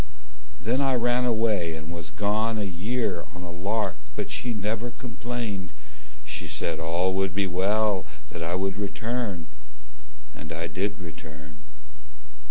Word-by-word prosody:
Then 115 +9 +2
I 135 -1 +4
ran 120 +1 +4
away 110 -8 +3
and 80 +1 -6
was 85 -1 -5
gone 110 +2 +2
a 105 - +1
year 100 +1 0
on 90 - -6
a 90 - -5
lark. 95 +2 0 0.2
But - - -2
she 125 - -1
never 110 +2 0
complained. 115 -6 -3 0.5
She - - -4
said 80 -1 -1
all 85 +3 +2
would 95 -1 +2
be 100 0 +4
well 100 +2 +3 0.2
That 85 - -5
I 85 +2 +1
would 95 0 +1
return. 105 -2 -1 0.9
And 80 -2 -7
I 80 +1 -1
did 95 +6 0
return. 75 -4 -9
100 Hz, 145 wpm, -28 LUFS, 85-110 Hz, 0.9 s, I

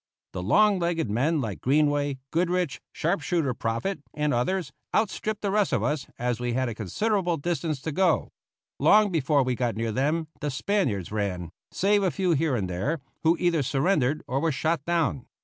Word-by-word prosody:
The 90 - -3
long 205 - +4
legged 170 -9 -1
men 145 +8 +1
like 110 -6 -4
Greenway, 145 0 +2
Goodrich, 175 -1 0
sharp 175 +5 -1
shooter 165 -8 0
Proffit, 115 - -2
and 150 0 0
others, 175 +10 0 0.2
outstripped 215 0 -1
the 200 - 0
rest 205 -1 +2
of 120 -6 +1
us, 145 +3 -1
as 120 -1 -1
we 120 -1 -1
had 130 +1 0
a 120 - -3
considerable 175 - 0
distance 160 -1 -2
to 160 - -3
go. 185 +5 +1 0.5
Long 210 -1 +5
before 145 -3 +2
we 130 0 0
got 120 -1 -1
near 115 0 -1
them 150 +7 0
the 150 - -2
Spaniards 130 - -1
ran, 95 -5 -2 0.2
save 205 +2 +2
a 190 - +2
few 185 +1 0
here 155 -3 +2
and 100 -5 -1
there, 100 - -2 0.2
who 165 +1 +3
either 170 -3 +2
surrendered 140 +1 +1
or 130 +2 -1
were 165 +2 +1
shot 155 +1 0
down. 165 -6 0
150 Hz, 185 wpm, -26 LUFS, 125-175 Hz, 0.5 s, Long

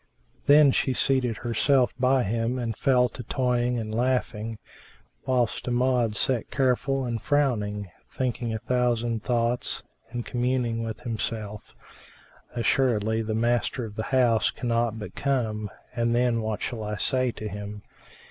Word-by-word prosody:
Then 145 -1 +7
she 130 - +1
seated 125 -4 +1
herself 125 +3 +2
by 130 0 +3
him 115 +4 -1
and 115 -3 -2
fell 125 0 +3
to 125 - -8
toying 125 0 0
and 110 -2 -4
laughing, 115 -2 -1 0.7
whilst 125 -3 0
Amjad 125 -2 +2
sat 120 +2 0
careful 135 0 +1
and 115 -2 -3
frowning, 105 -9 0 0.2
thinking 125 -2 -2
a 110 - -1
thousand 120 -1 0
thoughts 120 0 0 0.3
and 120 -1 -4
communing 120 -2 0
with 115 0 -5
himself, 110 -2 -4 0.8
"Assuredly 115 -2 +2
the 110 -1 -2
master 120 +1 0
of 105 -2 -9
the 110 - -3
house 120 -6 +3
cannot 115 -2 -1
but 105 - -7
come, 110 -6 -1 0.3
and 120 -1 +1
then 120 -1 +2
what 110 -1 -3
shall 120 -3 -3
I 105 0 -3
say 130 +3 +1
to 110 - -6
him? 105 0 -7
120 Hz, 140 wpm, -26 LUFS, 110-125 Hz, 0.8 s, Then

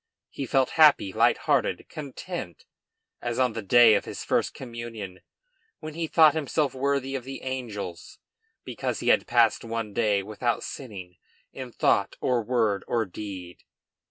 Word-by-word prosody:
He 135 - -5
felt 130 +1 +2
happy, 140 -11 +6
light - - +4
hearted, - - +1
content, 145 - -7 0.6
as 120 -1 -3
on 125 -3 +2
the 115 - -4
day 115 +2 +6
of 100 - +1
his - - -6
first - - 0
communion, 115 -6 -7 0.6
when 155 0 -7
he 165 +1 -3
thought 155 -1 +6
himself 150 -2 -1
worthy 135 0 -1
of 135 -2 -3
the 135 +1 -8
angels 105 -10 -6 0.5
because - - -4
he - - 0
had - - +3
passed 115 -2 +3
one 115 -2 -4
day 105 -3 +1
without 110 +3 -2
sinning 95 -9 -8 0.4
in 130 -2 -7
thought, 100 -3 +1
or 125 -2 +1
word, 110 -4 0
or 115 -2 0
deed. 95 -2 -8
120 Hz, 155 wpm, -26 LUFS, 105-135 Hz, 0.6 s, happy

